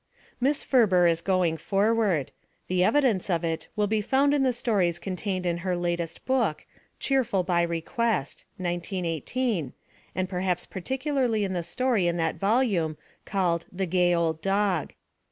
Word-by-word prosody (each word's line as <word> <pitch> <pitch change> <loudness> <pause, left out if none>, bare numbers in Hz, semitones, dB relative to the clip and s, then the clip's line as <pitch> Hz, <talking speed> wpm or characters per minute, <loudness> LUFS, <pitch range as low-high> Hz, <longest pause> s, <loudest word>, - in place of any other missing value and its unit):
Miss 275 +3 +1
Ferber 200 -9 +4
is 165 -1 +3
going 180 -3 +1
forward. 200 - +1 0.4
The 180 0 +2
evidence 235 -6 +2
of 170 -2 +1
it 165 -1 -2
will 210 -1 +2
be 215 +1 0
found 270 +6 +2
in 290 - +2
the 260 -1 +3
stories 205 -8 0
contained 185 0 -3
in 170 -1 0
her 180 0 -1
latest 170 -1 -3
book, 235 -12 0 0.3
Cheerful 240 -8 +1
By 175 -1 +1
Request 170 - -1
(1918) 175 - -2 0.4
and 185 0 -1
perhaps 180 -1 -1
par 190 - -7
ticularly 260 - 0
in 190 - -3
the 175 - -1
story 215 +2 0
in 170 0 0
that 165 -1 -1
volume 195 - +1 0.3
called 175 -4 0
The 190 +1 -2
Gay 175 0 +2
Old 160 -2 0
Dog. 195 -4 0
185 Hz, 155 wpm, -26 LUFS, 170-225 Hz, 0.4 s, Ferber